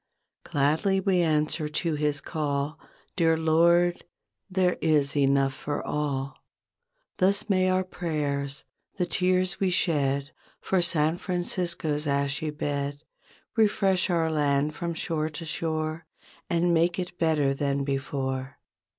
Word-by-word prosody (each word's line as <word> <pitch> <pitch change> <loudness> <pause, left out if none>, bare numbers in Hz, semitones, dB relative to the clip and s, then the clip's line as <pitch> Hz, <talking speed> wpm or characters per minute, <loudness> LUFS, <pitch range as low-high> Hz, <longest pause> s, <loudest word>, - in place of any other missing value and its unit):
Gladly 155 +8 +1
we 190 -2 +2
answer 155 -1 +1
to 165 +2 -1
His 150 -1 0
call 145 -1 -2 0.4
''Dear 165 -3 +3
Lord, 170 +2 +3 0.5
there 185 -1 +1
is 150 -3 +2
enough 135 -1 +3
for 145 +2 -4
all." 140 -2 -2 0.8
Thus 195 +3 +2
may 185 -1 +3
our 185 0 +2
prayers, 145 -6 -3 0.3
the 180 - +1
tears 185 0 +1
we 195 - +2
shed 140 -5 +1 0.3
For 190 -2 +1
San 165 -1 +1
Francisco's 170 -4 -2
ashy 140 +2 0
bed 145 -1 -3 0.5
Refresh 200 -4 +2
our 165 -2 +1
land 145 -1 +1
from 170 +2 -4
shore 160 -1 -1
to 155 +2 -6
shore 155 0 -3 0.4
And 170 +1 +2
make 170 +1 +2
it 180 -1 -5
better 150 -4 +2
than 140 0 -1
before. 135 -1 -3
155 Hz, 125 wpm, -27 LUFS, 145-175 Hz, 0.8 s, Dear